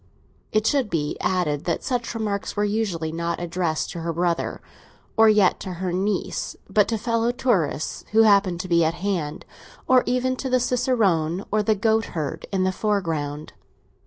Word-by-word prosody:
It 215 0 +1
should 265 -3 +2
be 150 -4 -1
added 160 -6 0
that 170 - -1
such 245 -3 -2
remarks 210 -3 -2
were 205 - +1
usually 200 -7 -1
not 170 +1 -2
addressed 170 -2 -2
to 170 - -6
her 165 0 -2
brother, 170 0 -1 0.6
or 225 -1 +6
yet 210 -4 +4
to 185 - -5
her 180 0 -3
niece, 195 +3 -2
but 210 -2 +3
to 225 - -1
fellow 230 +1 0
tourists 205 - -1
who 220 +1 +6
happened 200 -5 +4
to 185 - -7
be 170 -2 +3
at 160 +1 +1
hand, 175 -6 -3 0.4
or 255 -1 +6
even 255 +1 +1
to 265 - -3
the 255 0 +3
cicerone 200 -9 +1
or 215 +1 +2
the 215 +1 +2
goat 220 +1 +2
herd 155 +1 -4
in 190 -2 +1
the 185 - +2
foreground. 165 -8 -2
195 Hz, 175 wpm, -24 LUFS, 170-225 Hz, 0.6 s, or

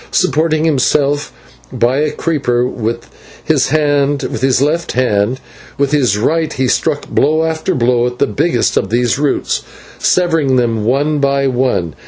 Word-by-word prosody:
Supporting 155 0 +1
himself 145 -1 +1 0.4
by 120 +3 +1
a 150 0 +1
creeper 135 -7 -1
with 115 -2 -4 0.4
his - - +1
left 145 0 0
hand, 120 -1 0 0.4
with 140 0 0
his 125 -9 +2
right 160 +7 0
he 130 -2 -1
struck 145 +3 -1
blow 155 +3 +1
after 160 +3 -1
blow 120 -1 +2
at 125 0 -6
the - - +2
biggest 120 - 0
of 95 - 0
these 120 +2 0
roots, 145 -1 -1 0.4
severing 165 -7 +1
them 115 -4 0
one 145 +5 +1
by 140 0 +1
one. 125 - 0
140 Hz, 140 wpm, -15 LUFS, 120-150 Hz, 0.4 s, his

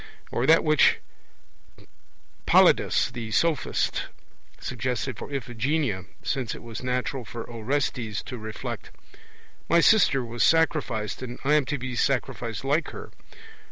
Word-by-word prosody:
Or 125 - 0
that 160 +1 +6
which 155 -2 +4 1.5
Polyidus - - +4
the 120 -3 -6
Sophist 155 +5 0 0.5
suggested 125 0 -3
for 140 - -8
Iphigenia; 125 - -1 0.2
since 125 -5 -2
it - - -11
was 115 -2 -7
natural 125 +1 -2
for 115 +1 -7
Orestes 115 -2 -2
to 125 - -7
reflect: 110 0 -6 0.8
'My 170 - +5
sister 165 - +4
was 120 0 -1
sacrificed, 150 -11 +1
and 125 -1 -6
I 145 +2 +2
am 150 -3 +4
to 145 +3 -2
be 130 0 -5
sacrificed 120 -4 -1
like 150 +5 +1
her.' - - -9
125 Hz, 125 wpm, -26 LUFS, 115-145 Hz, 1.5 s, that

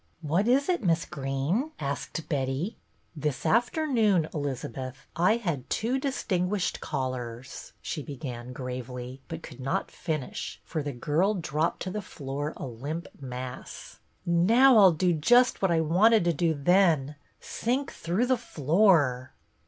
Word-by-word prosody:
" - - -41
What 195 +6 +3
is 265 +3 +3
it, 355 -9 0
Miss 170 -2 +2
Greene? 140 - -2
" - - -32
asked 140 +3 -4
Betty. 140 +6 -1 0.2
" - - -40
This 145 -3 -1
afternoon, 230 - +2
Elizabeth, 135 -2 -5
I 180 +7 +4
had 170 - -3
two 245 +4 0
distinguished 200 -8 -1
callers 130 -1 -5
— - - -39
"she 155 - -3
began 125 -4 -7
gravely, 125 0 -6
but - - -7
could - - -10
not 135 +1 -2
finish, 155 -6 -4
for 160 - -3
the 145 0 -3
girl 155 - +1
dropped 160 -3 -1
to 185 - -4
the 210 - -3
floor 145 -4 -5
a - - -5
limp 140 +7 -5
mass. 125 -1 -7
" - - -40
Now 225 +9 +6
I 200 - +8
'll 185 - +7
do 175 +2 +2
just 245 +11 +4
what 190 - +3
I 165 -1 +3
wanted 185 +6 +4
to 170 - +3
do 165 0 +1
then, 155 -2 +3 0.2
— - - -40
sink 260 +4 -2
through 180 +9 0
the 255 0 +2
floor." 150 - +2
160 Hz, 160 wpm, -28 LUFS, 135-205 Hz, 0.2 s, I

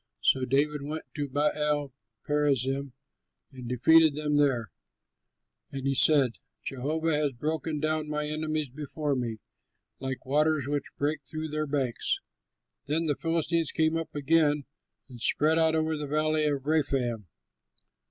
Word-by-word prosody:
So 130 -1 +3
David 145 +3 +1
went 155 +3 -5
to 145 -2 -3
Baal 145 0 0 0.3
perazim, 140 -2 0 0.6
and 125 -3 -8
defeated 155 +5 +5
them 150 -1 -1
there; 130 -7 +2 1.0
and 135 -1 -5
he 135 - +2
said, 135 -3 +4 0.2
"Jehovah 155 +5 -1
has 150 -2 +1
broken 155 +4 -2
down 155 0 -1
my 150 0 -1
enemies 155 -2 -2
before 150 +1 -3
me, 120 -3 -3 0.6
like 130 -1 -5
waters 150 0 +2
which 145 -1 -3
break 150 +1 0
through 155 +4 -5
their 155 0 -2
banks." 135 -4 0 0.7
Then 160 +3 0
the 145 -2 +1
Philistines 165 0 0
came 160 0 +1
up 165 -1 -4
again 145 0 +2 0.4
and 125 -4 -12
spread 155 +6 +2
out 160 0 +3
over 160 0 +1
the 150 -1 -4
Valley 155 +1 +1
of 140 -2 -1
Rephaim. 135 - 0
150 Hz, 140 wpm, -28 LUFS, 135-155 Hz, 1.0 s, defeated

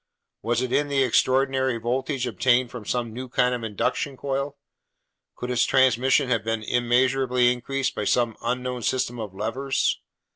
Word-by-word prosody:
Was 120 +2 0
it 125 - -3
in 145 0 +2
the 140 -1 +2
extraordinary 130 +1 +2
voltage 130 +3 -2
obtained 120 +2 +2
from 120 -4 -8
some 120 -2 -2
new 125 +2 -6
kind 125 0 +2
of 120 -2 -4
induction 115 +5 -2
coil? 140 +1 -3 0.8
Could 125 - -5
its 125 -1 +2
transmission 130 +1 +3
have 115 -4 0
been 115 0 -2
immeasurably 125 +1 +2
increased 135 +2 -2
by 105 - -3
some 120 +1 +1
unknown 125 +1 -2
system 120 +1 -1
of 105 -4 -6
levers? 130 +7 -1
125 Hz, 155 wpm, -24 LUFS, 120-130 Hz, 0.8 s, transmission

